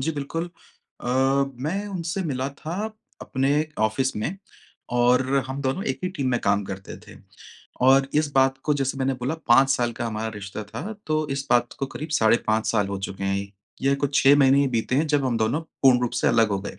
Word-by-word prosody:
जी, 160 +5 0
बिल्कुल। 165 +4 -4 0.5
अ, - - -5
मैं 135 +7 0
उनसे 185 0 -3
मिला 130 +1 -2
था 165 +3 -5 0.5
अपने 140 +3 0
ऑफिस 120 +5 +1
में 145 - -3 0.6
और 125 +2 +4 0.2
हम 135 +1 -5
दोनों 135 +9 -1
एक 135 -1 -2
ही - - 0
टीम 135 -2 -1
में 120 - +1
काम 100 0 +1
करते 95 0 -7
थे। - - -13 0.7
और 135 0 +5
इस 150 -1 +2
बात 135 0 +3
को 150 - +2
जैसे 135 -1 -2
मैंने 135 0 0
बोला, 125 +5 -3
5 135 -3 +4
साल 120 -3 +1
का 120 +1 -4
हमारा 110 0 -3
रिश्ता 100 +1 -7
था, 165 - -6
तो 155 0 0
इस 135 0 -3
बात 120 0 +3
को 135 - -1
करीब 155 +4 -7
साढ़े 110 +1 +5
5 110 0 +1
साल 105 -3 +1
हो 100 -1 -3
चुके 95 0 -6
हैं। 100 0 -1 0.3
यह 135 +1 +3
कुछ 140 -1 -1
6 140 +1 +7
महीने 135 0 +5
ही 140 - +2
बीते 120 0 -1
हैं 155 +2 +2
जब 145 -2 +1
हम 120 -3 0
दोनों 110 +8 +1 0.2
पूर्ण 130 -2 +6
रूप 120 -1 0
से - - +4
अलग 115 -2 +4
हो 100 - 0
गए। 100 - -8
135 Hz, 215 wpm, -24 LUFS, 115-145 Hz, 0.7 s, 6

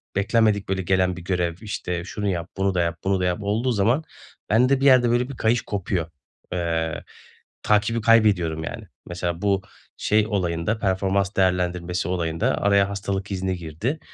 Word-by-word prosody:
beklenmedik 105 0 +2
böyle 95 -1 0
gelen 90 0 +1
bir - - -7
görev, 90 -2 -1
işte, 90 -5 -4
şunu 105 +3 -4
yap, 85 -2 -3
bunu 95 0 +1
da 90 - +2
yap, 85 -1 -1
bunu 95 0 +1
da 90 - 0
yap 90 -1 0
olduğu 110 +5 0
zaman 115 +8 +2 0.5
bende 125 +6 +3
bir - - +2
yerde 130 -3 +6
böyle 120 +2 +1
bir 140 - -8
kayış 110 +1 +2
kopuyor. 90 -5 -3 0.4
Eee, 80 -2 -2 0.6
takibi 105 +2 +2
kaybediyorum 100 -9 +3
yani. - - -6 0.2
Mesela 85 -1 -3
bu 100 -2 +1 0.4
şey 105 0 +2
olayında, 90 0 -1
performans 95 0 0
değerlendirmesi 90 -2 0
olayında 85 -3 0
araya 100 -1 +3
hastalık 100 0 -3
izni 95 -1 -2
girdi. 85 - -4
95 Hz, 160 wpm, -23 LUFS, 90-105 Hz, 0.6 s, yerde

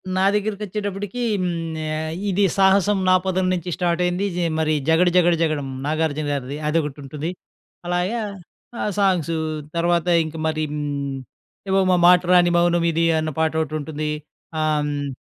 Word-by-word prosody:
నా 190 +1 +2
దగ్గరికొచ్చేటప్పుటికీ 205 +1 -3 0.2
హ్మ్, 180 - 0 0.5
ఆహ్, 155 0 -3 0.2
ఇది 195 +2 +2
'సాహసం 195 +1 +4
నా 185 - +6
పదం' 185 0 +1
నుంచి 180 0 -3
స్టార్టయింది. 180 +2 0
జె 175 -1 0
మరి 155 0 +1 0.2
'జగడ 170 +3 +4
జగడ 175 -1 +5
జగడం,' 145 -4 -1
'నాగార్జున' 155 -1 -1
గారిది, 140 +1 -4
అదొకటుంటది. 150 0 -3 0.6
అలాగే 180 +6 0 0.6
ఆహ్, 210 - -1
సాంగ్స్ 175 -4 +2 0.4
తర్వాత 170 0 +1 0.2
ఇంక 155 +1 -8
మరి 155 0 -1
హ్మ్, 140 -2 -3 0.5
ఏవో 195 0 +3
'మ 180 - +5
మాట 180 0 +7
రాని 175 -1 +5
మౌనమిది' 170 -1 +2
అన్న 155 0 -2
పాటోటుంటుంది. 155 -1 -1 0.5
ఆహ్, 155 -1 +1
హ్మ్ 145 -1 -3
170 Hz, 135 wpm, -22 LUFS, 155-185 Hz, 0.6 s, మాట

